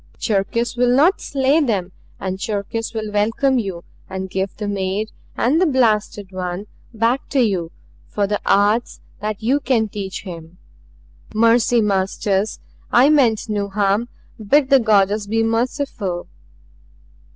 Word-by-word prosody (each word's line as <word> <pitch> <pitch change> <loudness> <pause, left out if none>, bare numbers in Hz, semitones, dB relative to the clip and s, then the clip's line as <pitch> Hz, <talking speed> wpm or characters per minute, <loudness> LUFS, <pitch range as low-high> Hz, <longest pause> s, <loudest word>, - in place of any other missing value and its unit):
Cherkis 225 +3 -1
will 245 0 +2
not 330 +9 +4
slay 275 +3 +2
them 200 - 0 0.3
and 190 0 -4
Cherkis 215 +2 -3
will 215 -1 -3
welcome 225 +6 +2
you 190 -6 -4 0.3
and 190 0 -5
give 190 0 -2
the 210 - -4
maid 200 +2 -2 0.3
and 295 +8 +2
the 370 - +4
blasted 215 -7 +1
one 185 +1 -4 0.3
back 230 +4 0
to 280 - +1
you 190 -8 +1 0.4
for 205 - -1
the 205 +1 -2
arts 205 +4 +2 0.2
that 215 +1 -4
you 265 +6 +2
can 245 -6 +1
teach 195 -2 -6
him. 170 -2 -9 0.8
"Mercy, 230 +1 +4
Masters, 195 0 0 0.3
I 255 +4 +6
meant 240 -9 +3
no 205 -2 -2
harm 205 +3 0 0.3
bid 275 +6 +3
the 275 - +7
Goddess 210 -2 +2
be 225 +2 +1
merciful!" 225 - -2
215 Hz, 140 wpm, -20 LUFS, 195-240 Hz, 0.8 s, the